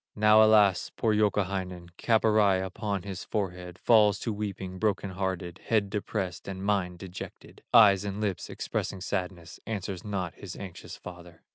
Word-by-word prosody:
Now 105 +1 +6
alas! 105 -3 +4
poor 110 -2 +2
Youkahainen, 95 -4 -1
Cap 115 -2 +2
awry 105 -3 +4
upon 95 +1 -3
his 95 -1 -6
forehead, 90 -3 -4
Falls 105 -3 +5
to 115 - -2
weeping, 95 -3 -5
broken 100 -1 0
hearted, 95 -2 -3
Head 105 -3 +1
depressed 100 -4 -3
and 95 0 -5
mind 95 -4 0
dejected, 95 +1 -10
Eyes 100 -4 +7
and 100 0 -4
lips 100 -4 -2
expressing 95 - -3
sadness, 90 -4 -4
Answers 100 -4 -4
not 95 -5 -3
his 95 -3 -9
anxious 95 -4 -9
father. 90 -2 -12
95 Hz, 150 wpm, -28 LUFS, 90-105 Hz, -, Eyes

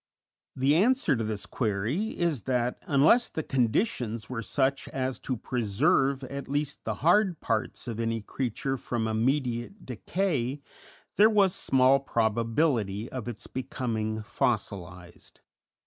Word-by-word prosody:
The 135 +2 +3
answer 225 - +3
to 115 - -2
this 105 -2 -3
query 120 - -2
is 165 -8 0
that, 125 -1 0
unless 155 - +4
the 160 - -4
conditions 120 - 0
were 120 -2 -3
such 135 +4 0
as 130 -1 -3
to 130 - -3
preserve 130 +4 +1
at 140 +2 -6
least 145 +1 -2
the - - -1
hard 180 -1 +4
parts 115 +2 -2
of 115 -2 -4
any 115 -1 -1
creature 135 +3 -2
from 115 -2 -2
immediate 120 - -1
decay, 140 - -1 0.6
there 215 +2 +7
was 200 -4 +4
small 135 -6 +4
probability 115 -2 0
of 125 -3 -5
its 120 -3 -6
becoming 110 -4 -3
fossilized. 95 -6 -3
125 Hz, 130 wpm, -28 LUFS, 110-145 Hz, 0.6 s, there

